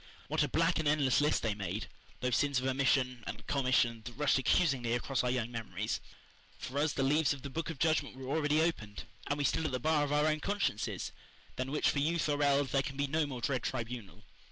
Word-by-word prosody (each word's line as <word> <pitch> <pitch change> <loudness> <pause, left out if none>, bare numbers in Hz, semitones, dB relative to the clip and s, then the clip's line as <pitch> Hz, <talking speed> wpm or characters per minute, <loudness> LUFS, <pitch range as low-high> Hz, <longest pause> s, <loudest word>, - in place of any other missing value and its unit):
What - - +1
a - - +3
black 165 +1 +2
and 160 - 0
endless 145 -3 +3
list 150 - +2
they 110 -2 +1
made 100 0 -4 0.4
those 125 -1 +1
sins 140 -2 +2
of 130 - -4
omission 130 -2 +1
and - - -6
commission 130 -4 +2
that 120 - -7
rushed 145 +1 +2
accusingly 130 -4 +2
across 125 +2 0
our 125 - +1
young 120 -2 -1
memories! 115 -2 -3 0.6
For 135 +3 -4
us 150 +1 +2
the 135 - 0
leaves 145 +1 +3
of 140 - -10
the 140 - -6
Book 165 +4 -3
of 165 - -5
Judgment 155 -3 +1
were 130 +2 -3
already 155 0 +2
opened; 110 -12 -2 0.2
and 145 - 0
we 145 - -1
stood 150 - +1
at 155 - -1
the 130 - -1
bar 155 +2 +2
of 145 - -2
our 150 +1 +3
own 155 0 +2
consciences, 200 - -2 0.4
than 130 +1 -3
which 150 - +1
for 140 - -1
youth 160 +3 +1
or 145 -1 0
eld, 140 -1 +3
there 135 - +2
can 135 +1 -6
be 140 - +1
no 155 +2 0
more 130 -4 -6
dread 130 0 0
tribunal. 115 -6 -5
140 Hz, 230 wpm, -32 LUFS, 125-150 Hz, 0.6 s, a